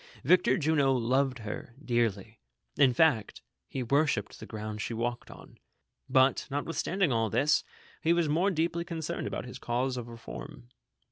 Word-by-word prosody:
Victor 180 +7 +4
Jimo 140 -5 +2
loved 130 +3 +1
her 110 +3 -6
dearly, 115 -5 -1 0.4
in 130 - +5
fact, 125 -6 +2 0.2
he 130 - -4
worshipped 140 -4 +1
the - - -9
ground 110 -1 -5
she 115 - -3
walked 120 +1 -3
on; - - -14 0.5
but, 130 +1 +3
notwithstanding 165 +4 0
all 115 -2 +1
this, 135 +8 +2 0.4
he 165 - +2
was 170 -2 +3
more 170 +7 +2
deeply 170 -1 0
concerned 165 -3 -4
about - - -4
his 125 +1 -9
cause 125 +2 -1
of 120 -1 -5
reform. 120 +1 -9
130 Hz, 150 wpm, -29 LUFS, 115-155 Hz, 0.5 s, in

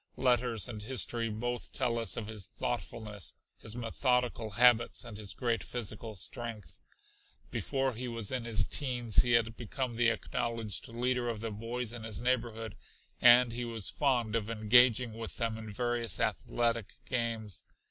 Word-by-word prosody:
Letters 125 -3 +2
and 110 -4 -6
history 115 0 0
both 120 +3 -4
tell 120 -3 0
us 115 - -3
of 115 - -3
his 105 -3 -8
thoughtfulness, 105 -4 -4 0.2
his 110 0 -4
methodical 120 -1 0
habits 120 +2 +4
and 115 - -8
his 105 -1 -5
great 120 -3 0
physical 110 -2 -4
strength. 115 0 -3 0.7
Before 135 -1 -1
he 125 +3 -5
was 115 -4 0
in 130 -2 -1
his 115 -2 +1
teens 125 -6 +3
he 120 -1 +1
had 115 -1 +3
become 120 +1 -4
the 120 -1 +4
acknowledged 115 -3 -2
leader 120 +1 -1
of 115 -2 -3
the 115 0 -4
boys 115 +2 -3
in 120 - -6
his 110 -3 -4
neighborhood, 115 -2 -1 0.5
and 120 0 +7
he 120 +1 -3
was 115 -4 -2
fond 120 -6 +1
of 110 -1 -1
engaging 115 +2 +4
with 115 0 -7
them 115 -2 -1
in 110 -1 -7
various 120 -2 -1
athletic 115 -3 0
games. 115 -5 -2
115 Hz, 155 wpm, -32 LUFS, 110-120 Hz, 0.7 s, and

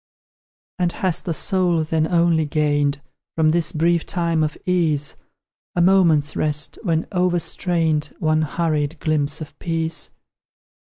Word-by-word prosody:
And 175 -1 +1
has 180 -2 -1
the 175 - -4
soul, 180 -4 +1
then, 155 0 0
only 170 -2 +2
gained, 145 -1 0 0.3
From 155 -1 +3
this 165 -1 +1
brief 170 +1 +1
time 170 -3 0
of 150 -1 -2
ease, 160 -6 0 0.6
A 175 - +2
moment's 170 -6 +3
rest, 150 0 0
when 165 -5 0
overstrained, 175 -3 0
One 155 0 +1
hurried 155 -1 -1
glimpse 155 0 0
of 155 - -10
peace? 165 -1 -2
160 Hz, 125 wpm, -21 LUFS, 155-175 Hz, 0.6 s, From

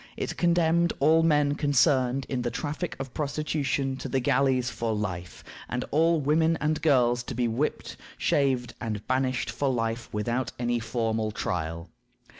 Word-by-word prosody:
It - - -3
condemned 170 -1 +2
all 160 +3 +5
men 150 -3 +3
concerned 135 -3 +2
in 130 -2 -2
the 120 - -1
"traffic 150 +8 -4
of 135 -2 -6
prostitution" 140 -2 -1
to - - -6
the 135 - +1
galleys 130 0 +2
for 115 -2 -2
life, 90 -5 -5 0.3
and 125 0 -2
all 165 +2 +3
women 160 +3 +2
and 150 +1 0
girls 125 -6 +3
to 125 +1 -6
be 120 0 +1
"whipped, 120 +7 -2 0.2
shaved, 130 -4 +1
and 105 -3 -4
banished 130 0 0
for 140 - -1
life, 115 -1 -2
without 120 +5 -2
any 120 0 0
formal 110 -1 -1
trial." 85 -4 -4
130 Hz, 155 wpm, -27 LUFS, 120-150 Hz, 0.3 s, all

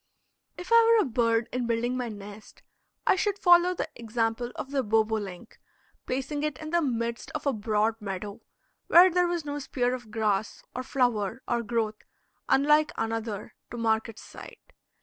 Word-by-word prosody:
If 360 +5 -9
I 465 0 +8
were 435 - +3
a - - -4
bird, 230 -1 +1
in 250 -1 -2
building 235 +2 0
my 250 -2 -3
nest 205 0 -11 0.4
I - - +4
should 400 +1 0
follow 350 -1 +5
the - - -3
example 230 +1 -2
of 270 - -6
the 280 -1 +1
bobolink, 220 -3 -1 0.5
placing 270 +3 -2
it 300 -3 -2
in 310 0 -7
the 345 0 +3
midst 235 -4 -2
of 305 - -4
a 280 - +2
broad 215 +1 0
meadow, 200 0 -6 0.5
where 360 +2 +7
there 355 +1 +2
was 345 -3 -2
no 290 0 -3
spear 250 -3 -1
of 245 -3 -7
grass, 210 -1 -1
or 255 - -2
flower 245 -4 -1
or 240 -1 0
growth 225 -2 -2 0.5
unlike 300 +2 +4
another 225 -2 -3 0.2
to 240 - -7
mark 220 -1 +1
its 225 - -11
site. - - -13
235 Hz, 170 wpm, -27 LUFS, 220-285 Hz, 0.5 s, I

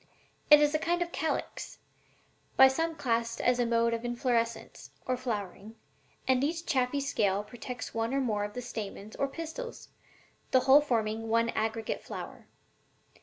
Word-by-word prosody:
It 295 -1 +10
is 295 0 +3
a 310 - +2
kind 345 +2 +1
of 345 - -10
calyx, 320 - -3 0.8
by 265 - +10
some 325 +4 -1
classed 230 -4 -1
as 250 0 +2
a 240 - +2
mode 230 0 +2
of 230 0 -3
inflorescence 240 -1 -2 0.2
(or 255 - 0
flowering), 215 -3 -5 0.5
and 260 0 +3
each 330 +3 -1
chaffy 260 +1 +1
scale 205 -8 0
protects 240 +3 -7
one 225 +1 -1
or 275 - +1
more 215 -6 0
of 205 0 -5
the 250 - -4
stamens 215 -2 -7
or 275 - +1
pistils, 330 - -7 0.6
the 260 - +4
whole 275 +3 +7
forming 225 -5 -1
one 230 +1 +2
aggregate 220 0 -2
flower. - - -8
245 Hz, 160 wpm, -30 LUFS, 225-275 Hz, 0.8 s, It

